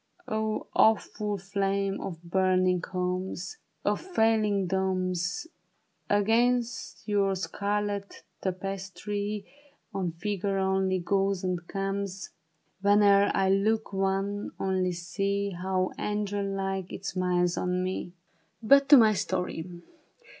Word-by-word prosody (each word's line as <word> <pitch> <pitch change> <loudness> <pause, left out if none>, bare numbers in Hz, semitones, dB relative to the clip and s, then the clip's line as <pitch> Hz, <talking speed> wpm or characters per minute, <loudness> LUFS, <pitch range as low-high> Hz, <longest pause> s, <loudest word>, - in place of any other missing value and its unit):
O 220 0 -1
awful 210 -1 +2
flame 195 0 -1
of 170 -2 -6
burning 185 0 +2
homes! 185 - -3 0.3
Of - - +1
falling 220 - +2
domes! 185 - -1 0.6
Against 230 +4 +1
your 200 -2 +2
scarlet 205 +1 -3 0.2
tapestry, 195 +2 -3 0.5
One 190 -5 -2
figure 195 +2 -2
only 190 0 +1
goes 195 +1 0
and 180 -2 -2
comes 195 -1 -3 0.5
Whene'er 200 0 +5
I 190 -1 +3
look, 215 +2 +1
one 195 +1 -1
only, 185 -1 0
see 200 +3 -2
How 185 +1 -1
angel 205 -1 -1
like 195 -1 -3
it 195 - -7
smiles 180 -2 +1
on 180 0 -1
me! 185 0 -2
THE - - -12
BARRICADE. 175 +4 -17
But 275 0 +7
to 290 - +10
my 220 -3 +6
story. 180 -3 -3
195 Hz, 110 wpm, -28 LUFS, 185-205 Hz, 0.6 s, to